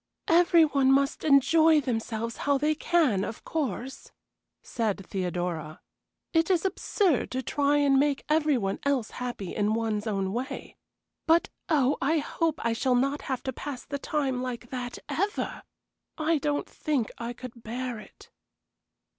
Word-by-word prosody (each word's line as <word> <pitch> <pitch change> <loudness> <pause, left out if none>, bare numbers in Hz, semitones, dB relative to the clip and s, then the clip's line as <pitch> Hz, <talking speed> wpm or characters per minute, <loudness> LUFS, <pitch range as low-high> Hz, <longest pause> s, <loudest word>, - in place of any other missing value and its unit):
"Every 340 -1 +6
one 275 -3 +3
must 275 +2 +2
enjoy 315 +2 +5
themselves 230 -3 -3
how 285 -1 +1
they 300 +2 +2
can, 300 - +2
of 220 - -6
course," 265 - -4 0.5
said 210 -4 -2
Theodora. 175 -4 -3 0.5
"It 325 +1 +3
is 360 -1 +2
absurd 375 - +1
to 260 +1 -3
try 285 +3 +2
and 280 -2 +4
make 285 -1 +1
any 305 -2 +3
one 195 -4 -2
else 275 -5 0
happy 240 -7 -5
in 210 +1 +1
one's 220 -1 -1
own 195 -2 -1
way, 265 +4 -5 0.5
but 330 +1 +4 0.2
oh, 285 -3 +2
I 315 +4 +2
hope 320 +1 -1
I 230 - +2
shall 250 +2 +1
not 275 +4 +1
have 260 -2 -3
to 260 - -3
pass 270 0 -6
the 280 -1 -4
time 270 -4 -1
like 245 -1 -5
that, 245 -1 -4
ever! 405 +5 -2 0.6
I 315 0 +1
don't 290 0 -1
think 275 -8 -2
I 235 +1 -4
could 245 -1 -10
bear 240 +1 -4
it." - - -15
265 Hz, 155 wpm, -27 LUFS, 230-300 Hz, 0.6 s, Every